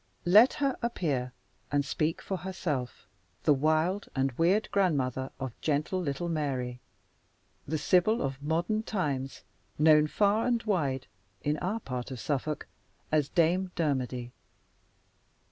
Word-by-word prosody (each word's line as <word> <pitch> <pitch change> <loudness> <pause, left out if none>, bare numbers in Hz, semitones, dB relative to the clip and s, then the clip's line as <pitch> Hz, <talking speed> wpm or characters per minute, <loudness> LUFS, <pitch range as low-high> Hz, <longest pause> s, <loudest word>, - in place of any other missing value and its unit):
Let 210 +8 +7
her 275 -3 0
appear, 150 - -1 0.4
and 145 -1 +1
speak 155 +3 -1
for 190 - -3
herself 165 -8 -4 0.4
the 150 - +5
wild 155 +7 +1
and 135 0 +1
weird 175 - +2
grandmother 135 -9 +1
of 130 -3 -4
gentle 155 +5 0
little 160 +2 -2
Mary; 135 -6 -2 0.9
the 155 +2 -1
Sibyl 180 +9 +3
of 135 0 -3
modern 170 +8 0
times, 145 -12 -3 0.3
known, 150 0 +6
far 210 +7 +2
and 235 -2 +1
wide, 140 - 0 0.4
in 150 +1 0
our 200 +6 -1
part 125 -5 -5
of 130 -2 -6
Suffolk, 145 +2 -2 0.5
as 150 -2 +2
Dame 180 +2 +2
Dermody. 130 -6 -1
155 Hz, 130 wpm, -29 LUFS, 135-185 Hz, 0.9 s, Let